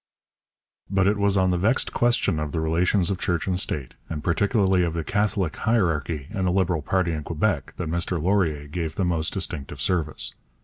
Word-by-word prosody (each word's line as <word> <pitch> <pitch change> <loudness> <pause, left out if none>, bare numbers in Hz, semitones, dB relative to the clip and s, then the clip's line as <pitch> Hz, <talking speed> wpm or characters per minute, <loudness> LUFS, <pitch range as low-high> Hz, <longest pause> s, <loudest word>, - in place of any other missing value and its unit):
But 95 -1 +2
it 100 +2 +3
was 100 -1 +2
on 95 -1 +3
the 90 - 0
vexed 110 +8 +1
question 120 -9 +2
of 75 -1 -3
the 80 - 0
relations 85 +4 +2
of 95 - -2
church 85 -3 -1
and 90 -1 0
state, 70 -8 0 0.2
and 75 -2 -4
particularly 95 +1 +2
of 85 -1 -1
the 85 - -2
Catholic 100 -3 0
hierarchy 80 - 0
and 95 -3 -1
the - - +2
Liberal 90 -3 +1
party 90 +3 0
in 80 -2 -3
Quebec, 80 -1 -1
that 90 - -3
Mr 85 +2 -1
Laurier 80 -5 +1
gave 80 0 -4
the 95 - 0
most 80 -4 0
distinctive 70 -2 -3
service. 85 -5 -1
90 Hz, 190 wpm, -24 LUFS, 80-95 Hz, 0.2 s, it